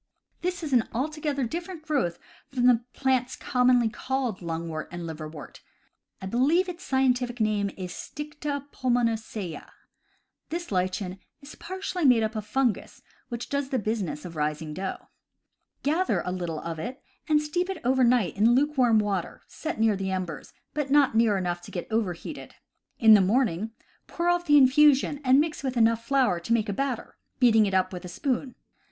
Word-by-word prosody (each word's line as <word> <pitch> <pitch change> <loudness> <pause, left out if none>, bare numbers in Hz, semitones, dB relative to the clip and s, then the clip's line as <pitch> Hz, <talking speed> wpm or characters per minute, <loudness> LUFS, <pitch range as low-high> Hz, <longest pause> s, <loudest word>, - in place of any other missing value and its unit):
This 360 -1 -2
is 295 -3 -3
an 240 -3 +3
altogether 290 +2 -2
different 335 +6 -5
growth 270 - 0 0.3
from 250 -2 0
the 245 -2 +5
plants 260 -2 0
com 250 0 +1
monly 245 -2 +5
called 260 -6 -2
lungwort 165 -2 -4
and 175 0 -6
liverwort 155 -2 -8 0.3
— - - -46
I - - -3
believe 275 - +2
its 355 -1 -7
scientific 250 -2 +1
name 210 -2 +1
is 185 -2 -5
Stida 295 +1 -5
pulmonacea. 225 -7 -1 0.8
This 345 -2 -4
lichen 185 0 -1 0.2
is 285 0 -12
partly 370 0 -5
made 250 -5 +5
up 220 +1 -2
of 215 -1 -4
fungus, 245 0 -1 0.3
which 240 -1 -5
does 280 -1 -2
the 265 - 0
business 210 -8 -2
of 170 -2 -8
raising 150 0 -2
dough. 190 +3 -5 0.8
Gather 325 +6 +1
a 180 - -2
little 175 -4 -3
of 165 -1 -5
it 245 - -6 0.3
and 305 -1 +5
steep 350 +5 -2
it 385 - -3
over 260 +1 +3
night 240 -6 +3
in 225 +4 +4
lukewarm 260 -5 +3
water, 200 -4 -2
set 320 -3 -5
near 220 -2 +3
the 195 0 -3
embers, 185 -4 -4 0.2
but 295 -2 -2
not 285 -2 +4
near 225 -2 +3
enough 175 -2 -2
to - - -11
get 175 - -5
overheated. 205 -6 -3 0.4
In 220 -2 +7
the 205 - +7
morning, 215 -1 +1 0.4
pour 345 0 -1
off 350 0 +1
the 295 0 +7
infusion 285 +1 +5
and 260 +1 +5
mix 310 +1 0
it - - -11
with 255 -1 -3
enough 230 0 +3
flour 260 -9 +2
to 175 +7 -1
make 220 -2 +1
a - - 0
batter, 260 +2 -3 0.2
beating 225 -4 +5
it 195 - -1
up 185 0 +1
with 180 0 -6
a - - -7
spoon. 255 - -2
240 Hz, 180 wpm, -27 LUFS, 190-280 Hz, 0.8 s, In